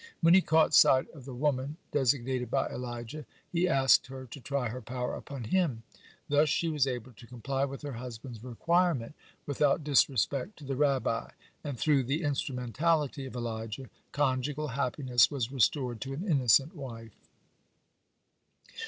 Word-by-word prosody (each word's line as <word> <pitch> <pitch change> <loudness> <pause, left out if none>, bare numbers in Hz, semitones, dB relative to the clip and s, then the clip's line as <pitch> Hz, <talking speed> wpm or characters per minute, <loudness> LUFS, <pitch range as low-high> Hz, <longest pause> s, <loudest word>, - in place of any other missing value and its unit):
When 165 0 +6
he 190 - +7
caught 160 -2 +3
sight 130 0 +6
of 140 -6 -13
the 135 - -7
woman 140 +2 -1
designated 130 -2 0
by - - 0
Elijah, 120 +4 -6 0.3
he 180 +1 +2
asked 135 -6 +4
her 130 0 -8
to 125 +3 -10
try 135 -2 -2
her 125 +3 -6
power 125 +2 -4
upon 140 -4 -7
him. 135 -4 0 0.4
Thus 145 +1 +3
she 165 +3 +1
was 150 -4 +1
able 125 -1 -4
to 115 +2 -15
comply 135 +3 -2
with 140 +1 -8
her 145 - -4
husband's 120 -1 -8
requirement 150 +1 0 0.3
without 145 +1 +1
disrespect 140 - +1
to 150 - -11
the 135 0 -2
Rabbi; 135 -5 +1 0.3
and 145 -4 -4
through 145 +1 +3
the 145 +7 -1
instrumentality 140 +1 -1
of 130 - -10
Elijah 115 +1 -5 0.2
conjugal 145 +2 -1
happiness 125 -2 +2
was 130 -4 -3
restored 125 -3 +1
to 135 +2 -4
an 180 +9 -5
innocent 135 - +3
wife. 115 -6 -8
135 Hz, 155 wpm, -30 LUFS, 125-145 Hz, 0.4 s, he